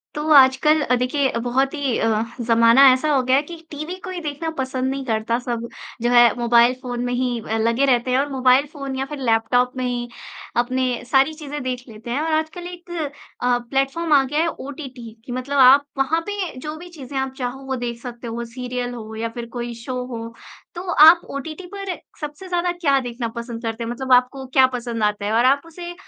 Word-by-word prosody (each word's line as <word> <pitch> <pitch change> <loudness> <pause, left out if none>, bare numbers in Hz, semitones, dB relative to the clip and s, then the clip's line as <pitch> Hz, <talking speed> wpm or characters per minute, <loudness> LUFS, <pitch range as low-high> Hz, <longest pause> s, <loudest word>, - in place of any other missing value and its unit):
तो 300 +1 -3
आजकल 280 +3 +6
अ, 250 - +2
देखिए 255 +2 0
बहुत 260 +3 0
ही 280 -5 -1
अ, 220 -1 +1 0.2
ज़माना 230 +2 +5
ऐसा 260 +4 0
हो 275 -2 +3
गया 255 +1 +3
है 275 - +4
कि 340 +3 -9 0.2
टीवी 305 +5 -5
कोई 370 -1 -5
देखना 300 +2 -4
पसंद 260 0 -1
नहीं 270 -1 -4
करता 225 0 0
सब 235 -1 -4 0.3
जो 240 - +1
है 240 -2 +6
मोबाइल 235 +1 +5
फ़ोन 245 -2 -4
में 245 - -2
ही 245 -1 -1
अ, 220 0 -2
लगे 230 +4 +2
रहते 250 -1 +2
हैं 255 - +3
और 285 +1 0
मोबाइल 260 +1 +3
फ़ोन 275 -3 -5
या 265 +1 -2
फिर 295 +1 -7
लैपटॉप 245 +1 +2
में 255 - -1
ही 245 -1 -2 0.5
अपने 250 0 0
सारी 275 +3 +4
चीज़ें 295 -1 -6
देख 250 -1 -3
लेते 225 +1 -11
हैं, 255 - 0
और 320 +1 -1
आजकल 315 +3 -2
एक 350 0 -11 0.5
अ, 245 0 +2
प्लेटफ़ॉर्म 275 +5 0
आ 280 -2 +6
गया 295 +4 0
है 335 - +1
ओटीटी 265 -6 -7
कि - - -8
मतलब 255 +3 -3
आप 270 +2 +7
वहाँ 295 +5 +1
पे 405 -3 -3
जो 300 +3 -6
भी 350 +2 -11
चीज़ें 280 -5 -8
आप 265 0 -2
चाहो 250 0 -4
वो 265 0 -2
देख 240 -1 -4
सकते 240 -1 -8
हो 230 - -5
वो 235 - -3
सीरियल 245 +1 -5
हो 220 -2 -8
या 225 +1 -3
फिर 240 -1 -5
कोई 240 0 -4
शो 250 +1 -3
हो, 230 -2 -7 0.4
तो 345 - -5
आप 325 +3 +8
ओटीटी 310 +6 -6
पर 395 -2 -4 0.3
सबसे 300 +5 -7
ज़्यादा 355 -1 0
क्या 310 -6 +2
देखना 240 -2 -4
पसंद 235 -1 -6
करते 225 0 -3
हैं? 230 - -4
मतलब 260 +1 0
आपको 255 +2 +2
क्या 265 -1 +7
पसंद 235 -2 -3
आता 210 -1 0
है, 210 - -1
और 235 +2 +3
आप 275 +2 +4
उसे 345 +1 -8
260 Hz, 220 wpm, -21 LUFS, 240-290 Hz, 0.5 s, आप